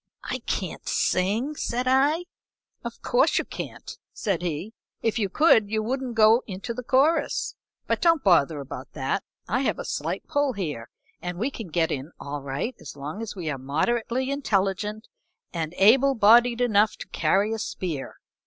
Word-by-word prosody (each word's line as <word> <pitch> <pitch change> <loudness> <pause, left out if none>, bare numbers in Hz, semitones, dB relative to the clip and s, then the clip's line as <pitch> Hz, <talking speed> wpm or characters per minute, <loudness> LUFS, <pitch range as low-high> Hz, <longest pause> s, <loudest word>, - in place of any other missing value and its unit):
"I - - -3
can't - - -3
sing," 215 +10 +1
said 250 -2 -2
I. 285 +7 +3 0.6
"Of - - -7
course - - +3
you - - +1
can't," - - -8
said 195 -6 -1
he. 175 +5 -3 0.3
"If 225 +1 +1
you 200 -3 0
could 220 - +4
you 215 0 0
wouldn't 255 +1 -3
go 220 +2 +6
into 200 +4 -5
the 250 - -5
chorus. 285 +5 +2 0.3
But - - -1
don't 335 -4 +4
bother 165 -5 +4
about 135 -1 -8
that, 140 +7 -1 0.3
I 230 +8 +1
have 265 - 0
a - - -5
slight - - -3
pull 285 -2 +1
here 150 - -4 0.3
and 180 +1 -4
we 240 +9 -1
can 225 -6 -7
get 165 0 0
in 140 +4 -4
all 145 0 -5
right 140 - -3
as 150 -4 -9
long 150 +9 -6
as 225 -2 -5
we 175 -4 -5
are 135 - -4
moderately 235 - -1
intelligent, 210 -4 -1 0.5
and 165 0 -3
able 265 +7 +5
bodied 235 +2 +5
enough 215 -3 +3
to - - -8
carry 195 +7 +1
a 225 - -3
spear. 165 -9 -4
215 Hz, 170 wpm, -25 LUFS, 170-250 Hz, 0.6 s, go